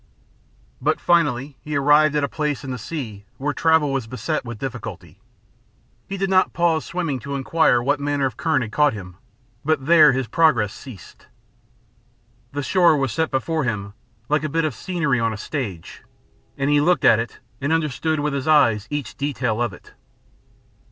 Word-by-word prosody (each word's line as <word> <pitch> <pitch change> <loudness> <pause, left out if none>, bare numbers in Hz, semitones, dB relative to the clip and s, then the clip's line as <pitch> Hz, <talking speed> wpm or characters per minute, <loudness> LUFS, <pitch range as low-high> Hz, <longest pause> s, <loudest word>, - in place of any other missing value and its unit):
But 155 +4 +1
finally 145 -6 +1
he 150 0 -5
arrived 150 +2 +4
at 150 - +1
a - - +1
place 150 -2 -3
in 135 - -5
the 125 - -5
sea 110 -7 -6
where 145 +2 -2
travel 160 -3 +2
was 135 -4 -2
beset 130 +6 -3
with 120 -2 -7
difficulty. 125 -1 -7 0.9
He 195 - -4
did 195 +1 0
not 185 -1 +3
pause 170 -2 +1
swimming 170 -6 -3
to 140 +3 -5
inquire 135 -3 +2
what 145 +2 +1
manner 145 -1 0
of 130 -5 -2
current 150 -5 0
had 110 - -7
caught 150 +3 +3
him, 90 -4 -9 0.5
but 150 -3 0
there 155 -2 +7
his 130 +1 -1
progress 120 -5 +2
ceased. 120 -10 -13 1.2
The 145 0 -3
shore 170 +3 +4
was 135 -3 -1
set 160 +6 0
before 155 +4 -1
him 100 -5 -3 0.3
like 150 +2 +1
a 155 - -2
bit 165 +2 0
of 155 - -1
scenery 165 -9 -1
on 115 -1 0
a - - -6
stage, 105 - -6 0.6
and 140 +1 0
he 145 0 +4
looked 175 +4 +2
at 115 - +6
it 115 -1 -5 0.2
and 140 +3 -1
understood 155 -1 0
with 150 -1 -1
his 140 +1 -3
eyes 115 -9 +4
each 145 -6 -5
detail 125 -5 -1
of 120 -2 0
it. 90 - -15
140 Hz, 180 wpm, -22 LUFS, 125-155 Hz, 1.2 s, there